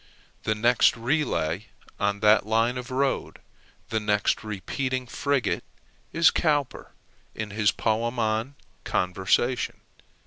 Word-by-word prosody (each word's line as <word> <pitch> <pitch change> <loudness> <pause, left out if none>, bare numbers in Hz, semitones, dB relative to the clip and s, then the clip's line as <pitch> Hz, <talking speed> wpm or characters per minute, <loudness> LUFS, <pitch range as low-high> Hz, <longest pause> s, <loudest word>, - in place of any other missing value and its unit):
The 110 - +1
next 120 +3 +3
relay 115 - -1 0.3
on 100 0 0
that 105 0 +5
line 115 +3 +2
of 125 - -8
road, 135 +1 -1 0.5
the 110 - 0
next 105 0 +1
repeating 130 +5 -3
frigate, 140 +1 -1 0.5
is 165 0 +5
Cowper 145 -5 -1 0.4
in 105 -2 -5
his 105 0 +2
poem 115 +2 -1
on 110 +4 -1 0.3
Conversation. 95 +7 0
115 Hz, 110 wpm, -26 LUFS, 105-130 Hz, 0.5 s, that